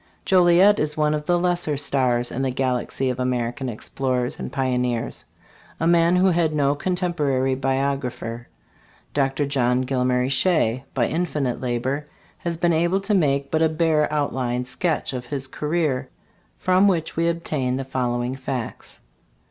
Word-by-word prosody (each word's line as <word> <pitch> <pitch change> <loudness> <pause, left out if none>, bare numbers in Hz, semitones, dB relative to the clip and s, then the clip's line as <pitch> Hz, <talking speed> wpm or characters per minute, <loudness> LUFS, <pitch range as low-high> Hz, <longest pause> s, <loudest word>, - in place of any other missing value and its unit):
Joliet 185 +3 +5
is 150 0 -1
one 150 0 +2
of 150 0 -3
"the 175 - +3
lesser 175 -4 0
stars 130 -4 +1
in 130 - -3
the 135 - 0
galaxy 130 0 -1
of 125 - -6
American 125 +1 -1
explorers 125 +2 -2
and - - -5
pioneers," 125 -3 -1 0.5
a 165 - 0
man 170 +1 +4
who 185 +1 +4
had 165 -3 +1
no 140 -1 +2
cotemporary 150 -6 0
biographer. 130 -3 -2 0.7
Dr. 135 0 +1
John 125 -3 +1
Gil 130 0 -1
mary 125 0 +1
Shea, 135 -4 +2
by 120 -3 +2
infinite 150 -7 -2
labor, 130 +4 -2 0.3
has 170 -1 -3
been 170 0 +2
able 175 +4 +1
to 210 +2 -1
make 140 -7 +1
but 160 - +1
a 160 - +4
bare 155 -1 +1
outline 125 -4 -1
sketch 155 +3 -1
of 125 -1 -5
his 135 -1 -3
career, 150 -2 -1 0.5
from 185 +2 +3
which 170 -5 0
we 165 +1 +1
obtain 150 -6 -1
the 135 - -3
following 125 -1 -2
facts. 130 -3 -6
140 Hz, 155 wpm, -23 LUFS, 125-165 Hz, 0.7 s, Joliet